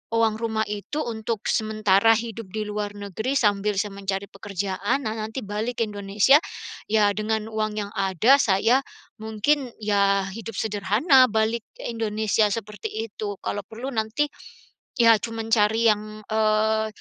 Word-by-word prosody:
uang 225 Hz, -1 st, +2 dB
rumah 220 Hz, -1 st, -1 dB
itu 210 Hz, +9 st, -4 dB
untuk 225 Hz, -2 st, -3 dB
sementara 215 Hz, 0 st, +3 dB
hidup 230 Hz, 0 st, -4 dB
di 215 Hz, -1 st, -2 dB
luar 205 Hz, 0 st, -3 dB
negeri 205 Hz, +5 st, -4 dB
sambil 210 Hz, -4 st, +2 dB
saya 210 Hz, +1 st, 0 dB
mencari 195 Hz, 0 st, -3 dB
pekerjaan, 200 Hz, +5 st, -2 dB
nah 215 Hz, -, -1 dB
nanti 220 Hz, +4 st, -4 dB
balik 220 Hz, +4 st, -3 dB
Indonesia, 205 Hz, +4 st, +3 dB, 0.5 s
ya 210 Hz, -1 st, +3 dB
dengan 220 Hz, 0 st, -1 dB
uang 215 Hz, -1 st, -1 dB
yang 205 Hz, -1 st, -3 dB
ada 195 Hz, +7 st, +4 dB
saya 225 Hz, +5 st, +3 dB, 0.4 s
mungkin, 240 Hz, +5 st, 0 dB
ya, 200 Hz, -2 st, +2 dB
hidup 225 Hz, 0 st, -7 dB
sederhana 220 Hz, -, +4 dB
balik 220 Hz, +1 st, 0 dB
ke -, -, -6 dB
Indonesia 220 Hz, -1 st, +1 dB
seperti 210 Hz, -2 st, -5 dB, 0.2 s
itu. 205 Hz, -1 st, -6 dB
Kalau 205 Hz, -, -3 dB
perlu 235 Hz, +6 st, -6 dB
nanti, 225 Hz, +4 st, -1 dB, 0.7 s
ya 230 Hz, -3 st, +6 dB
cuman 225 Hz, 0 st, -5 dB
cari 220 Hz, +1 st, +3 dB
yang, 215 Hz, 0 st, -5 dB
eee, 220 Hz, 0 st, +1 dB
215 Hz, 140 wpm, -24 LUFS, 205-225 Hz, 0.7 s, ya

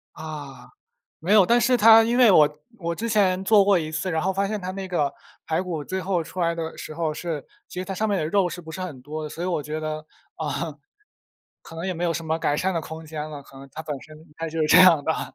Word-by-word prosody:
啊， 145 Hz, -5 st, -8 dB, 0.5 s
没 175 Hz, +5 st, 0 dB
有， 205 Hz, -4 st, +7 dB
但 240 Hz, +4 st, +4 dB
是 255 Hz, +1 st, +3 dB
它 225 Hz, 0 st, +8 dB
因 235 Hz, +2 st, +1 dB
为 245 Hz, -4 st, +7 dB
我 150 Hz, -3 st, +4 dB, 0.2 s
我 170 Hz, -2 st, -3 dB
之 230 Hz, +6 st, -4 dB
前 195 Hz, -4 st, +2 dB
做 205 Hz, 0 st, +5 dB
过 200 Hz, -2 st, +4 dB
一 155 Hz, -2 st, -4 dB
次， 170 Hz, +4 st, -2 dB
然 160 Hz, -2 st, 0 dB
后 190 Hz, -, +1 dB
发 195 Hz, +1 st, 0 dB
现 210 Hz, 0 st, -3 dB
它 180 Hz, 0 st, -4 dB
那 190 Hz, 0 st, -6 dB
个 150 Hz, -6 st, 0 dB, 0.3 s
排 160 Hz, +3 st, 0 dB
骨 165 Hz, -5 st, -4 dB
最 190 Hz, +4 st, -3 dB
后 185 Hz, -2 st, 0 dB
出 180 Hz, +3 st, -7 dB
来 170 Hz, -1 st, +1 dB
的 165 Hz, -1 st, -5 dB
时 155 Hz, -, -8 dB
候 160 Hz, -1 st, -1 dB
是 160 Hz, -3 st, -5 dB, 0.2 s
其 -, -, -8 dB
实 -, -, -4 dB
它 195 Hz, -, -5 dB
上 215 Hz, +3 st, -1 dB
面 200 Hz, -2 st, +1 dB
的 155 Hz, -, -1 dB
肉 190 Hz, +2 st, +2 dB
是 175 Hz, -, -7 dB
不 160 Hz, -2 st, -11 dB
是 185 Hz, -, -6 dB
很 160 Hz, -8 st, -6 dB
多。 155 Hz, +2 st, -5 dB
所 165 Hz, -, -7 dB
以 -, -, -1 dB
我 170 Hz, -5 st, -1 dB
觉 150 Hz, +2 st, -4 dB
得， 155 Hz, 0 st, -4 dB, 0.3 s
啊， 150 Hz, 0 st, -3 dB, 0.9 s
可 165 Hz, -, -12 dB
能 165 Hz, +3 st, -4 dB
也 185 Hz, -, -2 dB
没 175 Hz, +1 st, -3 dB
有 170 Hz, -, +1 dB
什 165 Hz, 0 st, -4 dB
么 160 Hz, 0 st, -1 dB
改 145 Hz, -2 st, 0 dB
善 190 Hz, +4 st, 0 dB
的 165 Hz, -, 0 dB
空 160 Hz, 0 st, -8 dB
间 155 Hz, -1 st, -5 dB
了， 145 Hz, -2 st, -8 dB
可 135 Hz, -, -17 dB
能 135 Hz, 0 st, -12 dB
它 160 Hz, -, -6 dB
本 150 Hz, -3 st, -4 dB
身 155 Hz, 0 st, -13 dB, 0.3 s
就 160 Hz, -1 st, 0 dB
这 -, -, +7 dB
样 175 Hz, -5 st, +7 dB
吧， 160 Hz, -, -2 dB
165 Hz, 285 characters per minute, -24 LUFS, 155-190 Hz, 0.9 s, 它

